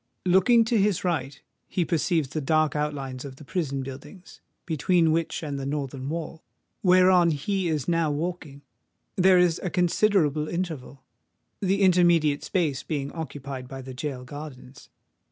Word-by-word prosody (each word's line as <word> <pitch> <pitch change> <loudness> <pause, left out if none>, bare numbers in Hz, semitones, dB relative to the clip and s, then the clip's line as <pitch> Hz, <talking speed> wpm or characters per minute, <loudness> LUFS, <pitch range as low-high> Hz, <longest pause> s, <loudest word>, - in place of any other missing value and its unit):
Looking 190 +6 +5
to 225 -1 +1
his 200 -3 +1
right, 145 -6 -2 0.3
he 180 - -1
perceives 165 -3 0
the 155 +1 -3
dark 155 +1 +1
outlines 140 -4 -3
of 135 -2 -8
the 140 - -13
prison 140 -4 -2
buildings, 135 +8 -11 0.2
between 165 +1 +2
which 165 +1 -1
and 145 -2 -4
the 135 - -4
northern 140 -2 -4
wall, 160 0 -5 0.4
whereon 180 -1 +5
he 180 +5 -1
is 155 -5 -1
now 165 -2 +1
walking, 150 -2 -4 0.5
there 185 0 +5
is 180 -2 +3
a 185 - -2
considerable 175 -4 +2
interval, 160 -7 -5 0.6
the 195 0 +1
intermediate 175 -5 +4
space 160 -8 -1
being 140 -3 -4
occupied 140 -5 -6
by 135 0 -8
the 130 0 -8
gaol 130 -1 -5
gardens. 140 -1 -10
155 Hz, 150 wpm, -26 LUFS, 140-180 Hz, 0.6 s, Looking